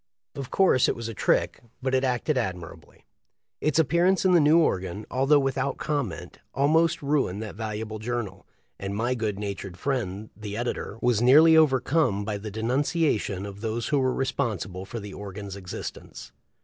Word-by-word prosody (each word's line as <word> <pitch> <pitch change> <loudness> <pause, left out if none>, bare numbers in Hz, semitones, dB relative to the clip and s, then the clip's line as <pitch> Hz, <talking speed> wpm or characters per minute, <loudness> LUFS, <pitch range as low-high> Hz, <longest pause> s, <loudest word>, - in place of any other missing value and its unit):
Of 135 -2 -6
course 180 -9 +4
it - - 0
was 115 -1 -5
a 115 - -5
trick, - - +1 0.2
but 130 0 -2
it 130 0 +2
acted 130 +3 0
admirably. 95 -9 -5 0.5
Its 155 -1 0
appearance 170 +5 +3
in 185 - +5
the 175 - +6
new 150 +2 +5
organ, 95 - 0
although 135 +3 +4
without 135 0 -1
comment, 140 - -3 0.2
almost 155 +3 +2
ruined 140 -9 0
that 105 - -7
valuable 110 0 -5
journal, 110 -4 -4 0.3
and 100 +1 -4
my 120 +4 0
good 110 -5 -2
natured 100 -3 -5
friend 110 -6 -3
the 105 -1 -6
editor 120 -3 -3
was 120 -3 +2
nearly 155 +6 +7
overcome 135 -7 +3
by 105 -1 -3
the 105 +1 -6
denunciation 115 - 0
of 100 0 -9
those 115 +1 -2
who 145 - +2
were 130 -1 +2
responsible 100 -8 -2
for 115 - -6
the 100 -2 -8
organ's 100 -1 -7
existence. 95 -3 -8
115 Hz, 165 wpm, -26 LUFS, 100-140 Hz, 0.5 s, nearly